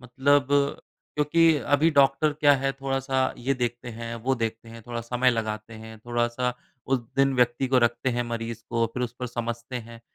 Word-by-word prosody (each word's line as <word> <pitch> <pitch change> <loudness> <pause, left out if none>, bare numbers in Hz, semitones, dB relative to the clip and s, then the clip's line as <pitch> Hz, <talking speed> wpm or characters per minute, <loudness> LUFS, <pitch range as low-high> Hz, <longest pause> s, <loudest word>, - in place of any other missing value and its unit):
मतलब 130 +2 +2 0.7
क्योंकि 160 +2 +4 0.2
अभी 160 +3 +3
डॉक्टर 140 +1 +3
क्या 145 -1 +4
है 135 +1 -1
थोड़ा-सा 135 -1 -1
ये 135 +3 0
देखते 120 -1 -3
हैं, 115 0 -6
वो 125 +3 0
देखते 115 -1 -4
हैं, 115 0 -11
थोड़ा 120 -1 -4
समय 125 +2 +1
लगाते 110 -1 -3
हैं, 110 0 -10
थोड़ा-सा 120 +2 -1 0.3
उस 135 0 +2 0.2
दिन 135 -1 +3
व्यक्ति 125 +2 +2
को 130 -1 +4
रखते 120 +2 +1
हैं 120 0 0
मरीज़ 115 -1 -4
को 115 -1 +1
फिर 125 - -2
उस 120 -1 -3
पर 125 - -2
समझते 120 +1 -4
हैं। 115 -1 -9
120 Hz, 185 wpm, -26 LUFS, 115-135 Hz, 0.7 s, क्योंकि